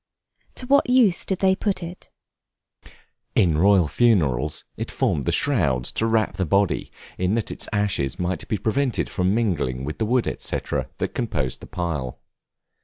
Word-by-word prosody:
To 255 Hz, -, -7 dB
what 275 Hz, 0 st, +3 dB
use 240 Hz, -8 st, +4 dB
did 190 Hz, -, -1 dB
they 190 Hz, 0 st, +3 dB
put 190 Hz, -2 st, -2 dB
it? 175 Hz, +2 st, -9 dB, 1.3 s
In 80 Hz, -5 st, +3 dB
royal 95 Hz, -2 st, +5 dB
funerals, 75 Hz, -, +1 dB
it -, -, -5 dB
formed 70 Hz, -, 0 dB
the -, -, +1 dB
shroud 80 Hz, -, +1 dB
to 110 Hz, -, -1 dB
wrap 110 Hz, -1 st, +1 dB
the 95 Hz, -, +1 dB
body 100 Hz, +3 st, +1 dB, 0.3 s
in 90 Hz, +3 st, +1 dB
that 115 Hz, -, -1 dB
its -, -, -5 dB
ashes 100 Hz, -, 0 dB
might 90 Hz, -1 st, -2 dB
be 105 Hz, -, -1 dB
prevented 125 Hz, +4 st, 0 dB
from 95 Hz, +2 st, +1 dB
mingling 75 Hz, -, 0 dB
with 75 Hz, +2 st, -5 dB
the 110 Hz, -, 0 dB
wood, 125 Hz, +1 st, +2 dB, 0.2 s
&c., -, -, -2 dB, 0.4 s
that -, -, -3 dB
composed 65 Hz, -1 st, -2 dB
the -, -, -11 dB
pile. 75 Hz, -8 st, -3 dB
100 Hz, 165 wpm, -23 LUFS, 75-125 Hz, 1.3 s, royal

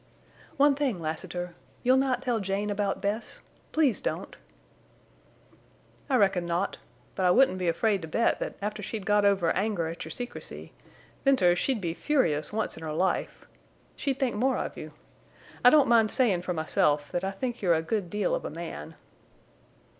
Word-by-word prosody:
"One 285 Hz, 0 st, +5 dB
thing, 270 Hz, -9 st, -1 dB
Lassiter. 175 Hz, +2 st, -4 dB, 0.3 s
You'll 255 Hz, +1 st, +5 dB
not 260 Hz, -1 st, +1 dB
tell 245 Hz, -3 st, 0 dB
Jane 200 Hz, +1 st, -2 dB
about 200 Hz, -1 st, -1 dB
Bess? 210 Hz, +3 st, -3 dB, 0.3 s
Please 295 Hz, -7 st, +2 dB
don't!" -, -, -4 dB, 1.7 s
"I 265 Hz, -, +3 dB
reckon 195 Hz, -6 st, +3 dB
not. 175 Hz, +3 st, -1 dB, 0.3 s
But 185 Hz, -2 st, +1 dB
I -, -, +5 dB
wouldn't 185 Hz, -2 st, +4 dB
be 180 Hz, -, -1 dB
afraid 195 Hz, +4 st, +1 dB
to 160 Hz, -, -6 dB
bet 230 Hz, +9 st, +1 dB
that -, -, -4 dB
after 210 Hz, 0 st, -3 dB
she'd 210 Hz, -1 st, -5 dB
got 205 Hz, 0 st, +3 dB
over 195 Hz, -5 st, +3 dB
anger 195 Hz, -4 st, 0 dB
at 165 Hz, -, -6 dB
your 160 Hz, -, -8 dB
secrecy—Venters, 240 Hz, -, -2 dB
she'd 260 Hz, -6 st, 0 dB
be 170 Hz, -3 st, -2 dB
furious 165 Hz, -, +1 dB
once 220 Hz, -4 st, -2 dB
in -, -, -9 dB
her 155 Hz, -1 st, -4 dB
life!—she'd 190 Hz, -, -3 dB
think 255 Hz, -5 st, 0 dB
more 260 Hz, +5 st, +1 dB
of -, -, -4 dB
you. -, -, -8 dB, 0.7 s
I 245 Hz, -, +9 dB
don't 290 Hz, -1 st, +5 dB
mind 230 Hz, -2 st, +5 dB
sayin' 210 Hz, -9 st, +2 dB
for 180 Hz, 0 st, -3 dB
myself 150 Hz, -3 st, +1 dB
that 175 Hz, -, -2 dB
I 190 Hz, -, 0 dB
think 240 Hz, +5 st, -4 dB
you're 175 Hz, -4 st, +3 dB
a 160 Hz, -, -1 dB
good 195 Hz, +1 st, -2 dB
deal 205 Hz, -1 st, 0 dB
of -, -, -1 dB
a -, -, -4 dB
man." 155 Hz, -, -7 dB
200 Hz, 170 wpm, -28 LUFS, 175-245 Hz, 1.7 s, I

